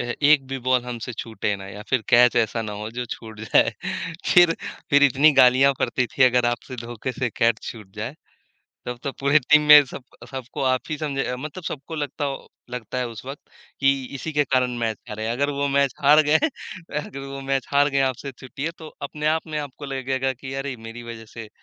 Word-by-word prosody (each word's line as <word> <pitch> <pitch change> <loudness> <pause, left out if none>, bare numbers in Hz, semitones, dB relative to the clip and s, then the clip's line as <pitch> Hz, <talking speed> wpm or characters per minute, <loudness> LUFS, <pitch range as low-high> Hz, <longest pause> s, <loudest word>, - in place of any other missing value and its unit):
अ, - - 0
एक 140 +3 +3
भी 135 0 -4
बॉल 125 -1 +3
हमसे 120 0 -5
छूटे 110 -2 -3
ना 95 0 -9
या 105 +1 -8
फिर 130 -3 +2
कैच 120 0 +6
ऐसा 115 +1 +1
ना 105 -1 -5
हो 105 +2 -6
जो 120 +1 -4
छूट 110 -2 -11
जाए। 110 - +3 0.6
फिर, 175 -2 +7 0.4
फिर 145 0 +5
इतनी 145 +3 +5
गालियाँ 130 +2 +6
पड़ती 125 0 0
थी 135 - 0
अगर 125 -1 +3
आपसे 120 +2 -6
धोखे 120 +2 -5
से 125 -1 -2
कैच 115 -1 +3
छूट 105 -5 -11
जाए, 115 +6 -4 0.7
तब 125 0 -4
तो 140 - -2
पूरे 140 +2 +4
टीम 150 +3 +5
में 150 -1 +10
सब 125 - -9 0.3
सबको 130 0 -6
आप 130 -1 +2
ही 155 - -2
समझे 135 -4 -2
मतलब 155 +7 -7
सबको 150 +2 -6
लगता 145 0 -3
हो 135 -1 -5 0.2
लगता 125 0 -5
है 125 -1 -1
उस 115 +1 -10
वक़्त 135 +2 -7 0.4
कि 135 0 +5 0.2
इसी 160 +4 -4
के 145 0 +3
कारण 130 -2 +1
मैच 115 -2 -1
हारे, 110 +1 -4
अगर 140 +5 0
वो 140 0 -1
मैच 140 -1 +2
हार 150 +2 +7
गए, 155 +1 +5 0.6
अगर 140 - -8
वो 135 0 -7
मैच 135 0 -1
हार 145 +1 +4
गए, 140 -1 +1
आपसे 135 +1 -1
छूटी 130 +2 -9
है 165 - -1
तो 160 - -10
अपने 150 +1 -5
आप 160 +1 0
में 155 -1 -3
आपको 145 0 -7
लगेगा 135 0 -1
कि 130 +1 -8
अरे! 135 -1 -3
मेरी 115 +1 -9
वजह 115 -1 -8
से 115 -2 -8
130 Hz, 215 wpm, -23 LUFS, 120-140 Hz, 0.7 s, में